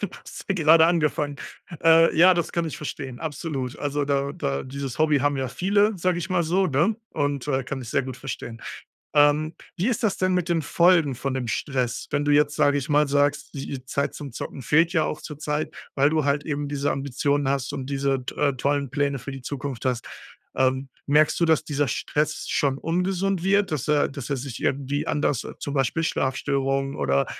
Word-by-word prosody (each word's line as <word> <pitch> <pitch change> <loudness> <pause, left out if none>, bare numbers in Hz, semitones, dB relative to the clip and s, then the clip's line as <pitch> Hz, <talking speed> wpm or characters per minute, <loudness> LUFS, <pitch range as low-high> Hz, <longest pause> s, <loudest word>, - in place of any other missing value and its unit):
da - - -3 0.2
hast - - -9
du 195 - +1
gerade 160 -1 +6
angefangen. 150 -3 +1 0.5
Äh, 165 0 +6
ja, 180 +3 +7
das 170 - -2
kann 170 -1 0
ich 160 - -5
verstehen, 135 -4 -6
absolut. 145 -4 -4
Also, 145 0 -1
da 140 0 0
da 70 - -2
dieses 135 0 -6
Hobby 155 -2 +4
haben 145 +1 +1
ja 130 -1 -2
viele, 200 - +1
sage 180 0 +1
ich 175 +2 -5
mal 180 -2 +2
so, 185 +4 +2
ne? 155 +11 +2 0.2
Und, 145 -1 -2
äh, 135 -2 0
kann 130 +1 -5
ich 120 - -9
sehr - - +1
gut 130 -1 -7
verstehen. 120 -3 -7 0.5
Ähm, 150 +2 +4 0.2
wie 190 +7 0
ist 235 -2 -1
das 210 - +1
denn 185 0 +1
mit 180 -1 0
den 165 -2 +1
Folgen 170 -4 +3
von 135 +2 -3
dem 125 -3 -3
Stress, 125 -3 -2
wenn 145 - 0
du 145 - +1
jetzt, 145 0 +3
sage 145 -1 +3
ich 140 - -5
mal, 150 -1 +3
sagst, 145 +1 +1
die 140 0 -5
i 130 -2 -7
Zeit 140 +2 -2
zum 145 -2 -7
Zocken 130 +3 -6
fehlt 165 +8 +3
ja 160 - +3
auch 155 - -3
zurzeit, 150 0 -4 0.2
weil 140 +1 +4
du 155 -1 +1
halt 145 +1 +1
eben 145 -1 -2
diese 145 0 -1
Ambitionen 140 +1 0
hast 135 -1 -1
und 135 -2 -5
diese 135 -2 0
t - - -6
äh, 145 -1 +2
tollen 140 +2 0
Pläne 140 0 0
für 140 +3 -7
die 135 -1 -8
Zukunft 135 -1 -5
hast. 125 -2 -1 0.5
Ähm, 130 +1 +1 0.2
merkst 150 +1 +3
du, - - +5
dass 160 -2 +3
dieser 145 -1 0
Stress 150 +6 -2
schon 135 -2 +1
ungesund 180 +2 -1
wird, 200 0 +3
dass 150 -5 -2
er 150 -1 +3
dass 140 -1 -7
er 140 - +1
sich 130 -2 -6
irgendwie 140 +1 -1
anders 145 -4 0
äh, - - -8
zum 140 - -5
Beispiel 135 +4 +1
Schlafstörungen 135 -1 -1
oder, 70 0 +1
145 Hz, 210 wpm, -24 LUFS, 135-160 Hz, 0.5 s, ja